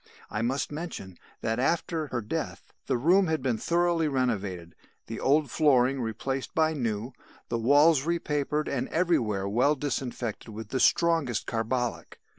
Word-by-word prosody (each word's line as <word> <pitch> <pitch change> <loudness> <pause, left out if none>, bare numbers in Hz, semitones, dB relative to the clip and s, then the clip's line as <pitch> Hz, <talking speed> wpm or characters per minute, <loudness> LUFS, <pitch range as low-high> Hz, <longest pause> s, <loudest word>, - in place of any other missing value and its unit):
"I 110 - -2
must 130 +5 -1
mention 150 - -6 0.3
that 115 +1 -1
after 160 +2 0
her 125 -3 -3
death, 105 - -5
the - - +1
room 180 +9 +4
had 160 -4 -1
been 120 -5 0
thoroughly 170 0 +1
renovated, 100 - -2 0.3
the - - -6
old 145 +2 +2
flooring 135 -3 +3
replaced 130 +4 -3
by 160 0 +3
new, 120 -3 -3 0.4
the 115 - -1
walls 145 +5 +5
repapered 150 -2 -1
and 130 -2 -2
everywhere 115 - +1
well 125 +9 +3
disinfected 125 -5 -4
with 110 0 -8
the 130 - -1
strongest 160 -5 +2
carbolic. 120 +1 -2
130 Hz, 145 wpm, -28 LUFS, 115-155 Hz, 0.4 s, walls